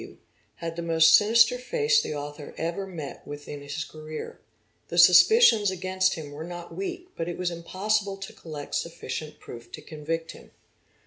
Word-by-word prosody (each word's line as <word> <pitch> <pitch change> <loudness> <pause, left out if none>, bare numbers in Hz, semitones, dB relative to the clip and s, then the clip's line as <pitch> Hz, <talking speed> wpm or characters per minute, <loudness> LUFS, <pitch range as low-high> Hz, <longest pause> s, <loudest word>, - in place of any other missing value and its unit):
W., - - -12 0.4
had 165 0 -6
the - - -2
most 165 -1 +5
sinister 225 +4 +5
face 450 - +2
the - - -4
author 145 0 -7
ever 170 +4 -3
met 160 -7 -7
with 145 0 -8
in 145 -1 -7
his 145 +3 -4
career. 155 0 -8 0.5
The 170 - -5
suspicions 205 - +7
against 185 0 0
him 150 -3 -8
were 150 +2 -7
not 175 0 -8
weak 365 -2 -5
but 165 +1 -3
it 175 - -5
was 180 -1 -1
impossible 195 +4 -1
to 195 0 -8
collect 150 -3 -9
sufficient 155 -2 -4
proof 120 0 -11
to 155 - -7
convict 165 +2 -4
him. - - -15
170 Hz, 175 wpm, -26 LUFS, 155-195 Hz, 0.5 s, suspicions